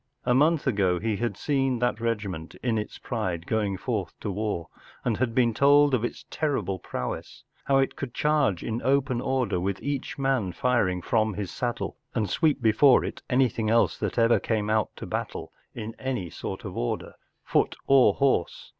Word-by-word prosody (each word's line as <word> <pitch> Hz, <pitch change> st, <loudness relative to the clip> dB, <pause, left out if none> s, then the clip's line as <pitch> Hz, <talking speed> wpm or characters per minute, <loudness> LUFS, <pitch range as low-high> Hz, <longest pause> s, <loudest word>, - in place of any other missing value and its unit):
A 125 Hz, -, +3 dB
month 150 Hz, +4 st, +3 dB
ago 100 Hz, -8 st, +2 dB
he 110 Hz, 0 st, -1 dB
had 115 Hz, -4 st, -2 dB
seen 135 Hz, -2 st, 0 dB
that 120 Hz, -1 st, 0 dB
regiment 100 Hz, -8 st, -3 dB
in 115 Hz, -3 st, +1 dB
its 105 Hz, -, -6 dB
pride 90 Hz, -8 st, -3 dB
going 105 Hz, -3 st, 0 dB
forth 105 Hz, -6 st, -3 dB
to 105 Hz, -, -2 dB
war, 105 Hz, -4 st, -2 dB, 0.4 s
and 115 Hz, -4 st, +1 dB
had 120 Hz, -2 st, -1 dB
been 120 Hz, -3 st, +3 dB
told 145 Hz, +2 st, +5 dB
of 120 Hz, -3 st, +2 dB
its 120 Hz, -, -4 dB
terrible 105 Hz, -, -1 dB
prowess, 65 Hz, -, -5 dB, 0.2 s
how 135 Hz, -, +3 dB
it 135 Hz, 0 st, +1 dB
could 135 Hz, -3 st, -5 dB
charge 140 Hz, -, +1 dB
in 115 Hz, +1 st, -3 dB
open 135 Hz, -2 st, +1 dB
order 125 Hz, -8 st, 0 dB
with 95 Hz, +1 st, -2 dB
each 140 Hz, -1 st, -3 dB
man 135 Hz, -9 st, 0 dB
firing 110 Hz, -9 st, +1 dB
from 110 Hz, -3 st, +1 dB
his 100 Hz, -3 st, -4 dB
saddle, 120 Hz, -1 st, -3 dB, 0.2 s
and 105 Hz, -5 st, 0 dB
sweep 150 Hz, -5 st, +1 dB
before 120 Hz, +4 st, +5 dB
it -, -, -6 dB
anything 125 Hz, -4 st, +2 dB
else 115 Hz, +1 st, +3 dB
that -, -, -3 dB
ever 115 Hz, 0 st, +4 dB
came 110 Hz, -2 st, -1 dB
out 110 Hz, -1 st, +2 dB
to -, -, -7 dB
battle -, -, -4 dB, 0.2 s
in 115 Hz, -1 st, -5 dB
any 125 Hz, -11 st, -3 dB
sort -, -, -6 dB
of -, -, -6 dB
order, -, -, -3 dB, 0.3 s
foot -, -, +1 dB
or 130 Hz, -7 st, +5 dB
horse. 135 Hz, -11 st, 0 dB
115 Hz, 180 wpm, -26 LUFS, 100-130 Hz, 0.4 s, told